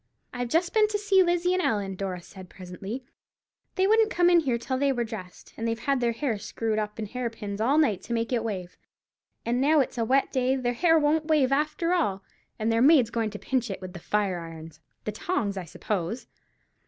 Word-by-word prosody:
"I've 245 Hz, -1 st, -3 dB
just 345 Hz, +6 st, +1 dB
been 430 Hz, -1 st, +5 dB
to 420 Hz, 0 st, -1 dB
see 400 Hz, -2 st, +4 dB
Lizzie 350 Hz, 0 st, +2 dB
and 370 Hz, -, +1 dB
Ellen," 205 Hz, -, 0 dB
Dora 185 Hz, -2 st, -4 dB
said, 185 Hz, -1 st, -12 dB
presently; 195 Hz, +8 st, -7 dB, 0.7 s
"they 375 Hz, -, +2 dB
wouldn't 440 Hz, +2 st, +4 dB
come 350 Hz, -4 st, +3 dB
in 345 Hz, -, +6 dB
here 260 Hz, -7 st, 0 dB
till 255 Hz, +2 st, -3 dB
they 280 Hz, 0 st, +3 dB
were 245 Hz, -3 st, 0 dB
dressed, 210 Hz, -5 st, -9 dB
and 230 Hz, -, -3 dB
they've 230 Hz, 0 st, -1 dB
had 275 Hz, -2 st, +1 dB
their 240 Hz, -1 st, +1 dB
hair 230 Hz, -3 st, -2 dB
screwed 215 Hz, +1 st, -2 dB
up 210 Hz, 0 st, -4 dB
in 220 Hz, -, -3 dB
hair 245 Hz, +3 st, -3 dB
pins 205 Hz, -2 st, -6 dB
all 265 Hz, +7 st, +3 dB
night 240 Hz, -, +2 dB
to 235 Hz, -, -5 dB
make 230 Hz, +2 st, -1 dB
it 235 Hz, -2 st, +1 dB
wave, 185 Hz, -5 st, -5 dB, 0.7 s
and 240 Hz, +2 st, 0 dB
now 300 Hz, +3 st, +4 dB
it's 260 Hz, -2 st, -1 dB
a -, -, +2 dB
wet 265 Hz, +4 st, +2 dB
day 260 Hz, 0 st, +1 dB
their 245 Hz, -2 st, -1 dB
hair 325 Hz, +6 st, +4 dB
won't 310 Hz, +1 st, +2 dB
wave 295 Hz, -5 st, +3 dB
after 305 Hz, +4 st, +1 dB
all, 200 Hz, -, 0 dB, 0.3 s
and 220 Hz, +1 st, 0 dB
their 225 Hz, 0 st, +2 dB
maid's 265 Hz, -5 st, +5 dB
going 225 Hz, -2 st, -1 dB
to 205 Hz, -, -7 dB
pinch 245 Hz, +1 st, -1 dB
it 195 Hz, -, -4 dB
with 185 Hz, -1 st, -8 dB
the 175 Hz, -, -8 dB
fire 195 Hz, -1 st, 0 dB
irons—the 165 Hz, +3 st, -9 dB
tongs, 215 Hz, -, -2 dB
I 190 Hz, -2 st, -5 dB
suppose." 200 Hz, +5 st, -3 dB
235 Hz, 220 wpm, -27 LUFS, 205-300 Hz, 0.7 s, in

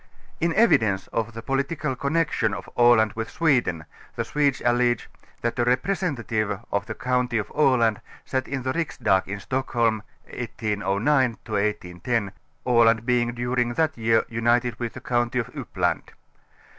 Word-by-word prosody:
In 170 Hz, +1 st, +1 dB
evidence 110 Hz, -, +3 dB
of 115 Hz, 0 st, -2 dB
the 115 Hz, -, -7 dB
political 140 Hz, +2 st, -1 dB
connection 140 Hz, -5 st, 0 dB
of -, -, -8 dB
Aland 120 Hz, -3 st, +5 dB
with 115 Hz, 0 st, -4 dB
Sweden 125 Hz, -, +1 dB, 0.3 s
the -, -, -2 dB
Swedes 145 Hz, -4 st, +1 dB
allege, 120 Hz, 0 st, +1 dB, 0.3 s
that 120 Hz, +2 st, -2 dB
a -, -, +4 dB
representative 125 Hz, -, 0 dB
of 100 Hz, -, -1 dB
the -, -, -5 dB
county 125 Hz, -1 st, 0 dB
of 105 Hz, -, -3 dB
Aland 125 Hz, -7 st, +3 dB, 0.2 s
sat 130 Hz, -1 st, -2 dB
in 135 Hz, -2 st, -3 dB
the 130 Hz, +1 st, -1 dB
Rik.sdag 95 Hz, -, 0 dB
in 100 Hz, +1 st, -4 dB
┬╗Stockholm 115 Hz, -1 st, 0 dB, 0.2 s
1809 115 Hz, +3 st, 0 dB
ŌĆö 110 Hz, -, -10 dB
1810, 105 Hz, +1 st, -1 dB, 0.3 s
Aland 115 Hz, -2 st, +4 dB
being 120 Hz, -1 st, +1 dB
during 120 Hz, 0 st, -1 dB
that 160 Hz, -1 st, +1 dB
year 115 Hz, 0 st, +2 dB
united 120 Hz, +1 st, +1 dB
with 120 Hz, -2 st, -3 dB
the -, -, -9 dB
county 120 Hz, 0 st, 0 dB
of 120 Hz, -, -2 dB
Uppland. -, -, -1 dB
120 Hz, 145 wpm, -24 LUFS, 110-130 Hz, 0.3 s, Aland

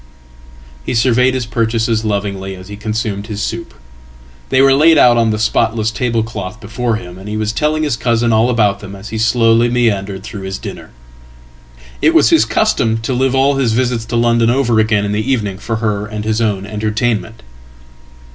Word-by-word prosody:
Hesurveyed 125 Hz, +2 st, +2 dB
his 130 Hz, -2 st, -2 dB
purchases 115 Hz, -1 st, 0 dB
lovingly 100 Hz, -2 st, -3 dB
as 95 Hz, +1 st, -12 dB
he 105 Hz, -, -7 dB
consumed 105 Hz, -1 st, -3 dB
his 105 Hz, -2 st, -5 dB
soup. -, -, -4 dB, 0.8 s
They 130 Hz, -, +2 dB
were 135 Hz, 0 st, +5 dB
laidout 145 Hz, -4 st, +5 dB
on 115 Hz, -1 st, +2 dB
the 110 Hz, -, 0 dB
spotless 110 Hz, 0 st, 0 dB
tablecloth 110 Hz, -4 st, -3 dB
before 115 Hz, +1 st, -2 dB
him, 90 Hz, -4 st, -8 dB
and 100 Hz, +2 st, -9 dB
he 105 Hz, -, -3 dB
was 110 Hz, 0 st, -1 dB
telling 155 Hz, +3 st, 0 dB
his 145 Hz, -6 st, -1 dB
cousinall 115 Hz, -1 st, +2 dB
about 105 Hz, -5 st, +1 dB
them 100 Hz, -1 st, -9 dB
as 100 Hz, +3 st, -10 dB
he 110 Hz, -, -4 dB
slowly 115 Hz, +1 st, +3 dB
meandered 100 Hz, -5 st, -1 dB
through 105 Hz, -2 st, -8 dB
his 95 Hz, 0 st, -5 dB
dinner. -, -, -9 dB, 1.1 s
It -, -, +3 dB
was -, -, +5 dB
hiscustom 115 Hz, 0 st, +2 dB
to 130 Hz, -, -2 dB
live 130 Hz, +1 st, +1 dB
all 135 Hz, +1 st, +2 dB
his 125 Hz, -5 st, +1 dB
visits 120 Hz, -1 st, 0 dB
to 115 Hz, +1 st, -4 dB
London 115 Hz, 0 st, +2 dB
over 120 Hz, -3 st, +2 dB
again 105 Hz, -2 st, +2 dB
in 100 Hz, -, -2 dB
the 110 Hz, +6 st, -1 dB
evening 105 Hz, -7 st, -1 dB
for 115 Hz, -, -3 dB
herand 105 Hz, -1 st, -3 dB
his 110 Hz, +1 st, 0 dB
own 100 Hz, -3 st, -1 dB
entertainment." 110 Hz, +1 st, -2 dB
110 Hz, 175 wpm, -15 LUFS, 105-120 Hz, 1.1 s, were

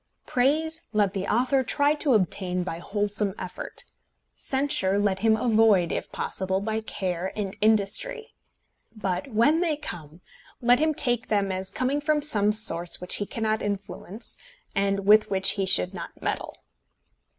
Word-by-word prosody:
Praise 315 Hz, +6 st, +1 dB
let 205 Hz, -2 st, +2 dB
the 195 Hz, -2 st, -3 dB
author 255 Hz, +3 st, +2 dB
try 285 Hz, +4 st, +2 dB
to 295 Hz, -4 st, +1 dB
obtain 180 Hz, -2 st, 0 dB
by 170 Hz, -2 st, -5 dB
wholesome 205 Hz, +1 st, -1 dB
effort; 180 Hz, -, -4 dB, 0.5 s
censure 265 Hz, -8 st, 0 dB
let 200 Hz, -2 st, +1 dB
him 220 Hz, +1 st, +3 dB
avoid, 220 Hz, -6 st, +3 dB
if -, -, -4 dB
possible, 190 Hz, 0 st, -2 dB
by 220 Hz, +2 st, -2 dB
care 185 Hz, -4 st, -3 dB
and 200 Hz, -3 st, -4 dB
industry. 225 Hz, -, +1 dB, 0.6 s
But 195 Hz, +3 st, -3 dB
when 235 Hz, +9 st, +3 dB
they 330 Hz, -4 st, 0 dB
come, 170 Hz, -, -8 dB, 0.4 s
let 245 Hz, 0 st, +4 dB
him 310 Hz, 0 st, +1 dB
take 245 Hz, -2 st, +3 dB
them 200 Hz, -2 st, 0 dB
as 190 Hz, 0 st, -3 dB
coming 270 Hz, +6 st, -1 dB
from 295 Hz, 0 st, +1 dB
some 210 Hz, -8 st, +2 dB
source 175 Hz, -6 st, +2 dB
which 180 Hz, -, -1 dB
he 205 Hz, -, -3 dB
cannot 220 Hz, -1 st, -1 dB
influence, 205 Hz, +1 st, -5 dB, 0.4 s
and 195 Hz, -1 st, 0 dB
with 215 Hz, +1 st, +5 dB
which 195 Hz, -1 st, +3 dB
he 195 Hz, -2 st, -2 dB
should 90 Hz, -, +3 dB
not -, -, -8 dB
meddle. -, -, -3 dB
210 Hz, 150 wpm, -26 LUFS, 190-250 Hz, 0.6 s, with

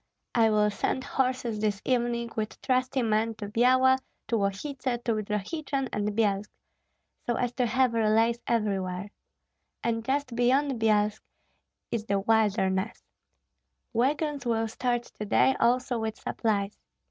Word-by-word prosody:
I 225 Hz, -2 st, +4 dB
will 210 Hz, -1 st, +3 dB
send 260 Hz, +5 st, -1 dB
horses 255 Hz, -5 st, -1 dB
this 210 Hz, -2 st, 0 dB
evening 240 Hz, -2 st, 0 dB
with 215 Hz, -1 st, -3 dB
trusty 255 Hz, 0 st, +1 dB
men 220 Hz, 0 st, +1 dB
to 210 Hz, -1 st, -6 dB
Byala, 255 Hz, +4 st, +4 dB, 0.3 s
to 235 Hz, -, +2 dB
Lostsi, 200 Hz, +7 st, -1 dB
to 255 Hz, -2 st, 0 dB, 0.2 s
Drohichyn 225 Hz, -, -2 dB
and 210 Hz, 0 st, -1 dB
Byelsk, 205 Hz, -2 st, +1 dB, 0.8 s
so 240 Hz, -, +1 dB
as 245 Hz, 0 st, -1 dB
to 250 Hz, -1 st, +1 dB
have 255 Hz, +1 st, +2 dB
relays 225 Hz, +1 st, +3 dB
everywhere. 200 Hz, -4 st, -1 dB, 0.7 s
And 230 Hz, -1 st, 0 dB
just 265 Hz, 0 st, -1 dB
beyond 255 Hz, +1 st, +2 dB
Byelsk 210 Hz, -1 st, +2 dB, 0.7 s
is 220 Hz, -2 st, -2 dB
the 200 Hz, -2 st, +1 dB
wilderness. 205 Hz, -2 st, +1 dB, 0.9 s
Wagons 285 Hz, +4 st, 0 dB
will 225 Hz, -2 st, 0 dB
start 240 Hz, +2 st, -1 dB
to 210 Hz, -, -8 dB
day 265 Hz, -, +4 dB
also 250 Hz, 0 st, +2 dB
with 220 Hz, -1 st, -3 dB
supplies. 205 Hz, -2 st, -2 dB
230 Hz, 135 wpm, -28 LUFS, 210-255 Hz, 0.9 s, I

